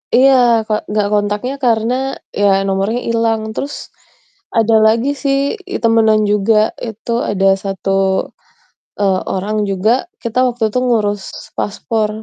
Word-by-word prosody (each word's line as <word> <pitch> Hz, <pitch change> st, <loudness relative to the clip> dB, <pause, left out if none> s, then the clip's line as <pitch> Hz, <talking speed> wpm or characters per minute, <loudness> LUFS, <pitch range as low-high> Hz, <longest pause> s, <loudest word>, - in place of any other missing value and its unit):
Iya, 245 Hz, -3 st, +4 dB
Kak, 215 Hz, -1 st, -3 dB
nggak 210 Hz, -1 st, 0 dB
kontaknya 210 Hz, +5 st, -1 dB
karena 230 Hz, -1 st, +1 dB, 0.4 s
ya 195 Hz, -1 st, +2 dB
nomornya 195 Hz, +4 st, 0 dB
hilang. 225 Hz, -1 st, 0 dB
Terus 280 Hz, +6 st, -6 dB, 0.6 s
ada 225 Hz, 0 st, +3 dB
lagi 230 Hz, +5 st, +2 dB
sih 275 Hz, -1 st, +2 dB, 0.4 s
i -, -, 0 dB
temenan 220 Hz, -1 st, +4 dB
juga, 215 Hz, +1 st, +2 dB
itu 225 Hz, +1 st, -7 dB, 0.2 s
ada 195 Hz, -1 st, +1 dB, 0.2 s
1, 195 Hz, 0 st, -3 dB, 1.1 s
eee, 190 Hz, -2 st, +2 dB, 0.2 s
orang 205 Hz, +3 st, -2 dB
juga, 195 Hz, +3 st, +1 dB, 0.3 s
kita 235 Hz, +1 st, -1 dB
waktu 245 Hz, -1 st, -3 dB
itu 215 Hz, -, -3 dB
ngurus 205 Hz, -5 st, 0 dB, 0.3 s
paspor, 215 Hz, +1 st, -1 dB
220 Hz, 130 wpm, -16 LUFS, 205-230 Hz, 1.1 s, Iya